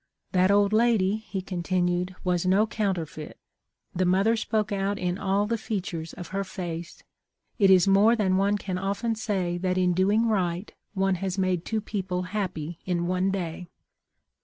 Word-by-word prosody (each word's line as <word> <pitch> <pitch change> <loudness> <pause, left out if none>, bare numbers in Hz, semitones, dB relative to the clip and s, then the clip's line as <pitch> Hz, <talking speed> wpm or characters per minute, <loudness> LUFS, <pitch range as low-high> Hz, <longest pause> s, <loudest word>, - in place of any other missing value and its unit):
That 185 0 +3
old 200 +1 +4
lady,' 215 -3 +3
he 205 -3 -6
continued, 180 0 -1
' - - -20
was 180 -2 +1
no 195 +4 +4
counterfeit. 185 -8 -3 0.6
The 185 - 0
mother 195 +5 +3
spoke 215 -1 -1
out 200 0 -1
in 180 +1 -2
all 200 +1 +1
the 230 +1 -1
feat 210 -3 -3
ures 160 -1 -6
of 175 -2 -8
her 195 +1 -2
face. 175 -3 -6 0.6
It 195 -2 +5
is 185 -1 +6
more 205 +4 +5
than 195 -5 +1
one 200 +2 +2
can 185 -2 -4
often 200 +4 -1
say 190 -6 -2
that 185 0 0
in 180 -1 +2
doing 205 +6 +2
right 185 -3 -1 0.2
one 195 0 +2
has 190 -1 -2
made 185 -3 0
two 220 -1 -1
people 190 -3 -3
happy 175 -6 -3
in 175 -2 -1
one 185 +2 +1
day. 180 -2 -4
190 Hz, 175 wpm, -26 LUFS, 180-205 Hz, 0.6 s, is